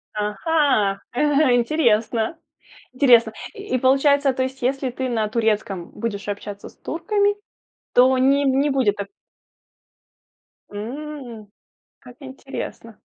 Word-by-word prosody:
Ага, 210 -1 +1
э 290 0 +3
интересно. 235 -1 +1 0.6
Интересно. 240 -4 +5 0.2
И 405 - -3
получается 275 +2 +3
то 260 - -2
есть, 260 0 -5
если 265 +1 0
ты 260 +1 -4
на 220 -3 0
турецком 210 -5 -1
будешь 210 -3 -5
общаться 205 0 -6
с - - -20
турками 410 +4 0 0.6
то 255 +1 +5
не 275 +2 +3
не 275 +2 +2
будет 260 -7 +2
так 200 -1 -4 1.6
М, 240 0 -7 0.5
как 250 -1 -15
интересно. 265 -4 -8
255 Hz, 110 wpm, -22 LUFS, 220-280 Hz, 1.6 s, Интересно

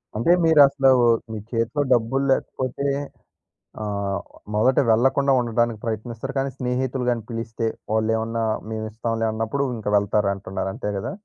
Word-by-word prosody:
అంటే 120 +10 +2
మీరసలు, 140 -4 +5 0.4
మీ 110 - -4
చేతిలో 115 +5 0
డబ్బులు 125 +4 +1
లేకపోతే, 130 +1 -2 1.0
ఆహ్, 100 -1 -2 0.4
మొదట 125 +5 +3
వెళ్ళకుండా 135 +4 +3
ఉండటానికి 120 -1 0
ప్రయత్నిస్తారు. 115 +4 -4
కానీ 135 0 -1
స్నేహితులు 125 0 -2
గాని 115 -3 -1
పిలిస్తే, 115 0 -3 0.3
వాళ్ళేమన్నా 115 +1 0 0.3
మేమిస్తాంలే 110 +1 -3
అన్నప్పుడు, 115 +6 -1
ఇంక 105 - -8
వెళ్తారంటున్నారు. 100 -2 -1
అంతే 105 - -3
గదా! 95 - -4
115 Hz, 115 wpm, -23 LUFS, 110-130 Hz, 1.0 s, మీరసలు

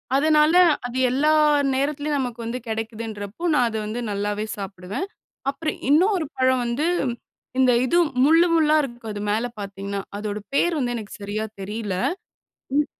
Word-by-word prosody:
அதனால, 305 +2 +4 0.3
அது 250 +1 -6
எல்லா 295 +4 +3 0.4
நேரத்திலேயும் 290 +1 0
நமக்கு 245 -2 -3
வந்து 245 +2 -3
கெடைக்குதுன்றப்போ, 220 - -5
நா - - +4
அத 220 - -6
வந்து 220 +3 -4
நல்லாவே 205 +1 -2
சாப்பிடுவேன். 195 - -5 0.5
அப்புறம் 310 +2 -3
இன்னொரு 355 +1 +3
பழம் 260 -1 +3
வந்து, 260 +7 0 0.7
இந்த 255 -1 +5
இது 345 +6 +2 0.3
முள்ளு 330 +4 +6
முள்ளா 310 -1 +4
இருக்கும் 235 -4 -6
அது 205 - -5
மேல 225 +3 +1
பார்த்தீங்கன்னா, 200 0 -5 0.2
அதோட 210 0 -3 0.2
பெயர் 345 +2 +2
வந்து 245 -1 -1
எனக்கு 215 -2 -7
சரியா 215 +2 -3
தெரில. 210 0 -4 0.8
ம். 295 - +3
240 Hz, 145 wpm, -23 LUFS, 210-300 Hz, 0.8 s, முள்ளு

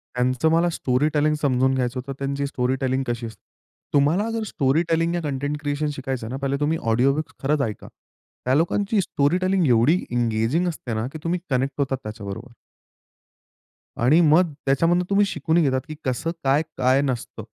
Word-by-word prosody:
त्यांचं 130 +5 +1
मला 170 +2 +3
स्टोरीटेलिंग 150 +1 +1
समजून 130 -1 +2
घ्यायचं 125 0 -1
होतं. 135 +2 -6
त्यांची 140 +1 -2
स्टोरीटेलिंग 130 0 -1
कशी 120 0 -3
असते. 110 - -10 0.5
तुम्हाला 160 +10 +2
जर 225 -1 -2
स्टोरीटेलिंग 165 +3 +1
या 175 - -1
कंटेंट 145 0 -2
क्रिएशन 145 +1 -1
शिकायचं 130 -4 -4
ना, 130 - -4
पहिले 140 0 0
तुम्ही 155 +2 +1
ऑडिओबुक्स 135 +6 +1
खरंच 145 +1 +1
ऐका. 110 -5 -4 0.6
त्या 130 - +2
लोकांची 200 +6 +1
स्टोरीटेलिंग 180 +4 +1
एवढी 125 +8 +4
एंगेजिंग 120 +8 +1
असते 140 -8 -4
ना, 110 +3 -2
की - - -5
तुम्ही 175 +1 -1
कनेक्ट 135 +1 0
होतात 135 -1 0
त्याच्याबरोबर. 110 +3 -7 1.5
आणि 135 +8 +5
मग 165 +2 +4
त्याच्यामधून 165 +6 +2
तुम्ही 200 +1 +4
शिकूनही 160 -1 +1
घेतात, 130 -2 +1
की 155 - -7
कसं 135 +6 -1
काय, 135 +2 +3 0.2
काय 130 +2 +3
नसतं 130 -4 -3
140 Hz, 155 wpm, -23 LUFS, 130-165 Hz, 1.5 s, आणि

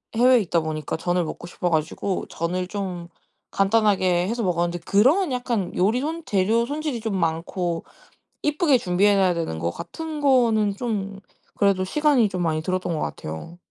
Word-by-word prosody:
해외에 250 +2 +5
있다 175 -5 0
보니까 155 -2 -3
전을 175 +1 0
먹고 160 - -7
싶어 175 0 -2
가지고 165 +4 -1
전을 180 +2 -2
좀 185 -3 -5 0.4
간단하게 195 -4 +2
해서 235 +1 -2
먹었는데 175 -1 0
그런 275 - +3
약간 235 -7 -2
요리 210 +7 +2
손 325 +3 -3
재료 215 +4 +2
손질이 290 -2 -3
좀 220 -2 -2
많고 170 +1 -2 0.6
이쁘게 300 -2 +3
준비해 200 +2 +3
놔야 190 -2 +3
되는 165 - -3
거 85 - -1
같은 315 - -6
거는 230 -7 +3
좀 200 -4 -3 0.4
그래도 200 -2 +2
시간이 280 -1 +3
좀 185 -2 -3
많이 160 -2 0
들었던 180 0 -1
것 - - -3
같아요. 80 - -6
195 Hz, 335 characters per minute, -23 LUFS, 175-235 Hz, 0.6 s, 해외에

